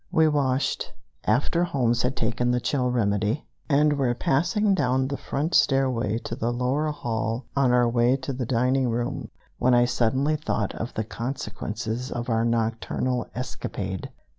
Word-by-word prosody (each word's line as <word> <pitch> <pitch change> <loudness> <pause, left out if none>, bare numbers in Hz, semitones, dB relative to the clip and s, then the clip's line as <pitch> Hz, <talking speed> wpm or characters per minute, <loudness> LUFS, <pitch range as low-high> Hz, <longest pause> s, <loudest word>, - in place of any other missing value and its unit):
We 160 0 +4
washed, 140 -3 0 0.3
after 140 +10 +2
Holmes 125 -8 +1
had 125 +2 0
taken 115 +2 0
the 125 0 +2
chill 125 0 0
remedy, 105 +1 0 0.2
and 150 +1 +4
were 130 -4 +1
passing 195 - +2
down 130 -5 +1
the 140 - -2
front 150 +4 -3
stairway 130 -7 +2
to 115 - -4
the 115 0 -1
lower 130 +5 0
hall 115 -3 -2
on 135 -3 +3
our 125 -1 +4
way 120 +2 +3
to 135 +1 -4
the 125 -2 -3
dining 125 +1 +2
room 120 +1 -2 0.3
when 125 0 +4
I 120 0 +5
suddenly 130 +5 +1
thought 115 -9 -2
of 115 - -4
the 110 - 0
consequences 115 +1 -4
of 120 0 -3
our 115 0 +2
nocturnal 115 +2 -1
escapade. 100 -6 -4
125 Hz, 160 wpm, -25 LUFS, 115-135 Hz, 0.3 s, I